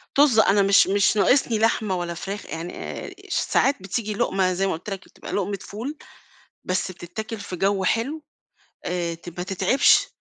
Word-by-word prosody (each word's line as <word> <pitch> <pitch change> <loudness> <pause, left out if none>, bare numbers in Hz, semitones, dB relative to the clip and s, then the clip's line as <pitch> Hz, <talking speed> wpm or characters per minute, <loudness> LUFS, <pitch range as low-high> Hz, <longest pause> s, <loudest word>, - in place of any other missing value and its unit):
طظ، 275 -6 +5
أنا 205 -1 +5
مش 200 +1 +5
مش 200 +2 +3
ناقصني 225 +2 +3
لحمة 215 -3 +1
ولا 175 -1 -3
فراخ 195 +4 -6
يعني 165 +2 -6
آآ، - - -6 0.2
ش - - -2
ساعات 280 +1 +2
بتيجي 210 +2 -2
لقمة 190 -2 +1
زي 195 +2 0
ما - - 0
قُلت 175 +6 -7
لك 195 -1 -6
بتبقى - - -11
لقمة 200 -1 -1
فول، 255 +9 -6 0.7
بس 185 0 -1
بتتاكل 210 +5 -7
في 190 -2 -6
جو 195 +1 +1
حلو، 270 +10 0 0.6
آآ، 175 -1 -1
ت 170 +1 -9
ما 180 - -2
تتعِبش، 190 +7 +3
195 Hz, 175 wpm, -24 LUFS, 185-220 Hz, 0.7 s, طظ